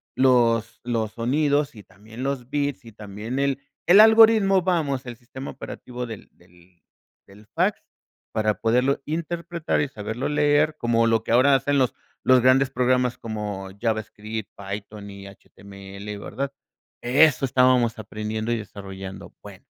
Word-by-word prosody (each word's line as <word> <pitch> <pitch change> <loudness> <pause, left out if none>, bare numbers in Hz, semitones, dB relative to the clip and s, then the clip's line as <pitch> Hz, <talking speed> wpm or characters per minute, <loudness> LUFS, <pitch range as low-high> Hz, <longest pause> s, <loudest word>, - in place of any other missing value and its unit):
los 120 -3 +2
los 115 -3 -2
sonidos, 145 +4 0
y 105 - -11
también 110 +6 -13
los 135 -3 -3
bits, 145 -4 -2
y 115 - -11
también 105 +4 -6
el 140 -1 0 0.3
el 190 +4 +8
algoritmo. 220 -3 +6
Vamos, 150 -8 0
el 120 - -6
sistema 130 +2 -9
operativo 125 0 -7
del 110 -3 -9
del 85 -1 -24 0.4
del 105 +2 -17
fax 180 - 0 0.5
para 110 -2 +1
poderlo 125 +5 +2
interpretar 170 +1 -3
y 145 - 0
saberlo 110 0 -4
leer, 150 +1 +2
como 115 -2 +2
lo 115 -1 +2
que - - -4
ahora 135 +3 +5
hacen 145 +1 +1
los, 130 - +1 0.3
los 130 -1 +5
grandes 130 +1 +4
programas 125 -1 +1
como 105 -3 -5
JavaScript, 110 -1 -3
Python 100 +1 -7
y 100 0 -10
HTML, 100 +1 -10
¿verdad? 135 +7 -4 0.5
Eso 135 +2 +4
estábamos 125 -2 +3
aprendiendo 110 +2 -4
y 120 - +1
desarrollando, 95 -2 -9
bueno. - - -13
120 Hz, 140 wpm, -24 LUFS, 105-140 Hz, 0.5 s, el